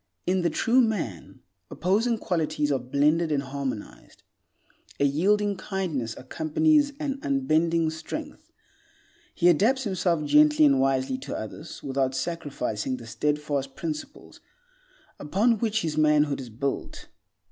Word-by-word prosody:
In 185 +1 +1
the 170 - +1
true 235 +10 +3
man 185 - -3 0.3
opposing 220 +6 +1
qualities 155 -6 -1
are 135 - +1
blended 150 +6 +1
and 140 -2 0
harmonized; 135 -5 -6 0.8
a 140 - +3
yielding 200 +8 +2
kindness 175 - -3
accompanies 285 - +1
an 280 -3 -3
unbending 165 - +1
strength. 160 0 -7 0.8
He 175 - +3
adapts 225 - +3
himself 180 -6 0
gently 150 +1 +5
and 140 -2 +4
wisely 135 - +1
to - - -5
others 130 +9 -8
without 135 -1 -1
sacrificing 130 -6 -3
the 120 - -11
steadfast 140 +3 -2
principles 155 -2 -7 0.8
upon 210 +9 +1
which 220 -3 0
his 155 -2 -1
manhood 150 -2 +3
is 125 - -9
built. 135 +5 -4
155 Hz, 125 wpm, -26 LUFS, 140-195 Hz, 0.8 s, gently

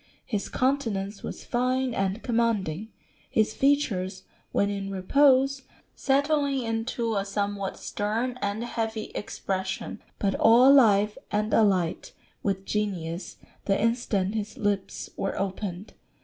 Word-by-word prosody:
His 210 -5 -3
countenance 225 -7 -1
was - - -7
fine 255 +1 0
and 195 +1 -1
commanding, 220 -6 0 0.4
his 215 0 +2
features 205 -10 +1 0.3
when 200 0 +1
in 195 -1 -4
repose 270 +7 +3 0.3
settling 280 -1 +1
into 225 0 -1
a 200 - +1
somewhat 200 -1 -2
stern 225 +5 -2
and 205 +3 -1
heavy 225 -2 -3
expression, 190 -2 -4 0.2
but 195 -1 0
all 235 +3 +6
alive 210 -6 +5
and 210 +1 0
alight 190 -6 +2 0.3
with 195 -1 -1
genius 185 -5 -3 0.3
the 195 -1 +2
instant 220 -4 0
his 215 -1 -4
lips 205 -2 -2
were 195 - -2
opened. 195 0 -4
210 Hz, 120 wpm, -27 LUFS, 195-240 Hz, 0.4 s, all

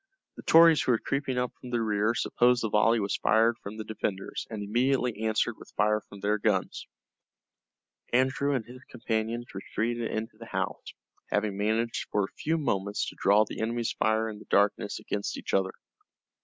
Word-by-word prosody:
The - - -9
Tories 165 -1 +7
who 125 - +2
were - - +3
creeping 140 +1 -2
up 125 0 -1
from 125 - -8
the 120 -1 0
rear 110 0 +1
supposed 120 0 +2
the 110 - 0
volley 115 +2 +4
was 100 -2 -1
fired 115 +2 +3
from 105 0 -8
the 110 - -4
defenders, 105 -3 -4
and 110 -2 -5
immediately 125 +2 +1
answered 110 +1 0
with - - -13
fire 105 +1 +2
from 100 -1 -14
their 105 +1 +1
guns. 100 -3 -1 1.2
Andrew 130 +3 +2
and 120 -4 -2
his 125 +2 -12
companions 115 0 -3
retreated 115 +4 -2
into 110 0 -4
the 115 - -10
house, - - -4 0.3
having 105 -1 0
managed 110 +3 -1
for 105 - +1
a 95 - -5
few 160 +1 0
moments 100 -9 -1
to - - -13
draw 105 +2 +4
the - - -6
enemy's 115 +1 -1
fire 110 +1 +1
in 105 -2 -7
the - - -13
darkness 100 0 +1
against 100 0 -3
each - - -6
other. 95 -1 +2
110 Hz, 185 wpm, -28 LUFS, 105-120 Hz, 1.2 s, Tories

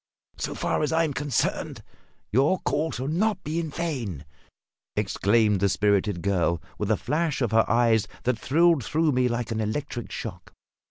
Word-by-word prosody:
"So - - -3
far - - -1
as 150 - 0
I 165 +1 +3
am 155 -3 -1
concerned, 140 -3 -1 0.5
your 135 - +3
call 145 +5 0
shall 130 +2 -4
not 190 +5 0
be 155 +3 -2
in 165 -2 -3
vain!" 130 - -4 0.7
exclaimed 105 0 +2
the 100 +1 +2
spirited 100 -2 +1
girl, 85 -4 +1 0.2
with 105 - -2
a 110 - +3
flash 150 +3 -1
of 120 -5 0
her 110 0 +3
eyes 115 -2 +3 0.2
that 125 -2 0
thrilled 165 -1 +3
through 160 +6 +1
me 125 -1 +2
like 120 -1 -2
an 110 0 -1
electric 120 +2 -3
shock. - - -7
125 Hz, 170 wpm, -26 LUFS, 105-155 Hz, 0.7 s, I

